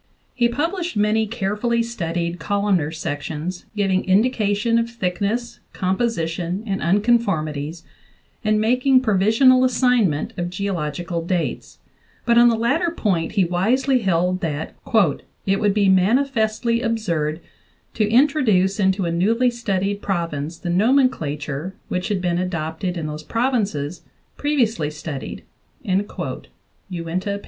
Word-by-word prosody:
He 240 -2 +2
published 335 - -2
many 215 +1 +2
carefully 230 +2 -1
studied 170 -6 -3
columnar 200 -6 +1
sections, 160 +2 -5
giving 195 -2 +1
indication 210 +2 +2
of 230 0 -1
thick 185 -6 -3
ness, 235 +4 -2
composition, 185 -2 -1
and 195 -3 -2
unconformities, 170 -6 0 0.6
and 215 0 +2
making 255 +4 +3
provisional 225 +4 +4
assignment 245 - +2
of 175 0 -2
geological 175 -3 -3
datesj 175 0 -3 0.5
but 235 - +3
on 240 0 +7
the 230 - +2
latter 270 +10 +1
point 190 - -1
he 195 -4 +3
wisely 250 +10 +2
held 180 -3 +1
that 155 -2 -3 0.7
"it 195 0 +1
would 205 -2 +2
be 205 -2 +3
manifestly 230 +3 +2
absurd 170 - -1 0.5
to 215 -2 +1
introduce 225 -7 +3
into 190 -1 +2
a 170 - -1
newly 225 +9 +2
studied 200 -4 -2
province 165 -4 -3
the 175 0 -4
nomenclature 175 - +1
which 180 0 -2
had 200 -3 -1
been 175 -1 +1
adopted 175 0 -3
in 165 - -3
those 150 0 -5
provinces 205 - -1 0.3
previously 235 - 0
studied" 150 -2 -6 0.4
(Uinta, 200 +1 -3 0.4
38). 180 +3 -3
200 Hz, 120 wpm, -21 LUFS, 170-235 Hz, 0.7 s, on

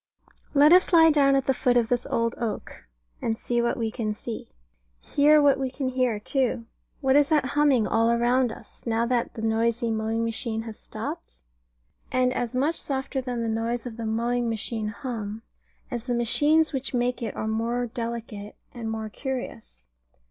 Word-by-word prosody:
Let 295 +3 +7
us 370 +2 +5
lie 325 -1 +8
down 275 -2 +4
at 270 -1 +1
the 270 - +2
foot 245 -1 +2
of 235 -2 +2
this 245 -1 0
old 230 0 0
oak, 225 - -5 0.3
and 225 -1 -1
see 240 +1 -1
what 235 +3 0
we 225 -2 -1
can 215 -3 -3
see. 225 +1 -6 0.6
And - - -16
hear 300 +1 +6
what 280 -2 +4
we 265 -1 -1
can 265 0 -3
hear, 250 -4 0
too. 240 0 -1 0.4
What 265 -1 +3
is 290 -1 +5
that 300 -4 +3
humming 285 -6 +3
all 225 +2 +2
round 245 +1 +2
us, - - -12
now 230 0 +1
that 240 -1 -1
the 220 - -6
noisy 230 +1 +1
mowing 220 +1 -1
machine 225 0 -2
has 225 -2 -9
stopped? 290 +10 -7 0.7
And 255 0 +2
as 245 -1 -3
much 290 +6 +1
softer 270 0 -2
than 245 -2 -3
the - - -1
noise 235 +1 -2
of 235 -2 -7
mowing 235 +2 0
machine 220 0 -3
hum, 215 0 -5 0.5
as 240 0 -4
the 245 - 0
machines 295 +7 +3
which 270 -1 -3
make 245 0 0
it 230 - -4
are 220 - -3
more 230 +3 -1
delicate 230 -3 -6 0.2
and 230 -2 -5
more 220 -1 -3
curious. 235 - -6
240 Hz, 185 wpm, -26 LUFS, 225-265 Hz, 0.7 s, lie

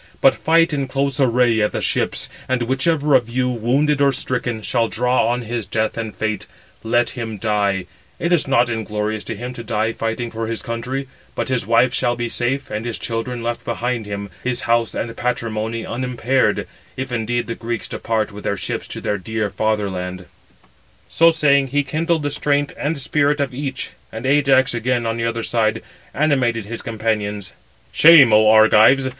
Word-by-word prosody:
But - - +5
fight 165 +1 +2
in 140 -2 -1
close 135 +1 -1
array 120 -3 +3
at 105 - +1
the - - -1
ships, - - -1 0.2
and 130 -2 +1
whichever 145 +4 +1
of 120 -3 +3
you, 125 +1 0
wounded 135 +5 +1
or 140 -1 +5
stricken, 125 -3 -2
shall 115 0 +1
draw 125 +3 +1
on 120 +1 -1
his 115 -1 -4
death 110 0 -1
and 110 -2 -5
fate, 110 -3 -3 0.3
let 120 +1 +1
him 115 -3 -5
die; 100 -3 0 0.3
it 170 +1 0
is 155 -4 +2
not 120 -3 +3
inglorious 105 -1 -3
to - - -4
him 125 +4 -6
to 120 - -8
die 110 +1 0
fighting 115 +1 -3
for 115 0 -4
his 115 0 -4
country; 125 +4 -4 0.3
but - - -2
his 125 -5 -1
wife 115 +2 +4
shall 120 -2 +1
be 120 0 -3
safe, 135 +4 -2
and 110 +2 -3
his 115 - -3
children 115 +1 -4
left 120 0 -3
behind 120 -2 -2
him, 100 -1 -5
his 125 -1 -1
house 115 -1 +1
and 115 0 -4
patrimony 115 -2 -2
unimpaired, 125 +1 0 0.3
if 130 0 -4
indeed 120 0 -1
the 115 - -4
Greeks 115 0 -4
depart 110 -1 -2
with 105 +1 -10
their 100 - -1
ships - - -4
to - - -7
their 105 - -1
dear 110 +1 -3
father 105 +1 0
land." 90 -1 -5 0.8
So 165 0 +5
saying, 140 -4 +3
he 145 +2 0
kindled 160 +3 -1
the 145 - -1
strength 145 0 0
and 150 +2 -2
spirit 145 +2 +1
of 140 -2 -1
each: 135 0 -4 0.2
and 115 +3 -7
Ajax 135 -2 +3
again, 120 0 0
on 115 0 -1
the 115 - -1
other 115 0 -2
side, 110 -1 0 0.3
animated 130 -7 +1
his 115 +2 -6
companions: 105 -3 -2 0.4
"Shame, 150 -8 +8
oh 110 0 +6
Argives! 110 +4 +6
120 Hz, 185 wpm, -20 LUFS, 110-130 Hz, 0.8 s, Shame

